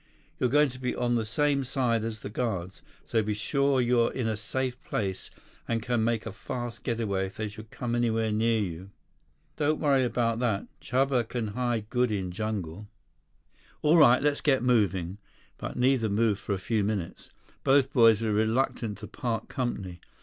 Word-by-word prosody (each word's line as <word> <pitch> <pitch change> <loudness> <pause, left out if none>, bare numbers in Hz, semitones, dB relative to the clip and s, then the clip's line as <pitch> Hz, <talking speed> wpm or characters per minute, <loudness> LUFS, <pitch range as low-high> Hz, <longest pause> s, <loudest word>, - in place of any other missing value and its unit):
You're 125 - +2
going 145 +2 +4
to 130 0 -10
be 125 -1 -2
on 120 0 0
the 115 -2 0
same 145 +3 +1
side 125 -4 0
as 110 -1 -4
the - - -6
guards, 95 -6 -3 0.2
so 115 - +1
be 105 0 -2
sure 140 +5 +1
you're 120 -1 +3
in 125 -4 -2
a 110 - 0
safe 125 +4 -3
place 95 -3 -3 0.4
and 115 - 0
can 120 -2 0
make 115 -1 0
a - - -4
fast 120 +2 -6
getaway 110 -6 -1
if 95 - -12
they 110 - -2
should 110 +1 -10
come 120 +1 -4
anywhere 115 -2 +1
near 110 +1 +2
you." 95 -1 -4 0.7
"Don't 155 0 +1
worry 140 -3 +3
about 115 -1 0
that. 115 -5 0 0.2
Chuba 130 -2 +1
can 115 -4 -2
hide 120 -1 -1
good 125 -2 +2
in 95 -3 -2
jungle." 100 -2 -4 1.0
"All 155 +3 +5
right, 125 -4 +6
let's 145 -1 +1
get 135 -5 +2
moving." 100 -6 +1 0.4
But - - -5
neither 125 -3 +2
moved 105 0 +2
for 100 - -3
a - - -3
few 105 +3 0
minutes. 100 -4 -3 0.3
Both 135 0 +3
boys 115 -4 +6
were 110 -2 0
reluctant 110 0 0
to - - -8
part 115 -3 -3
company. 100 -9 -3
115 Hz, 180 wpm, -28 LUFS, 105-125 Hz, 1.0 s, right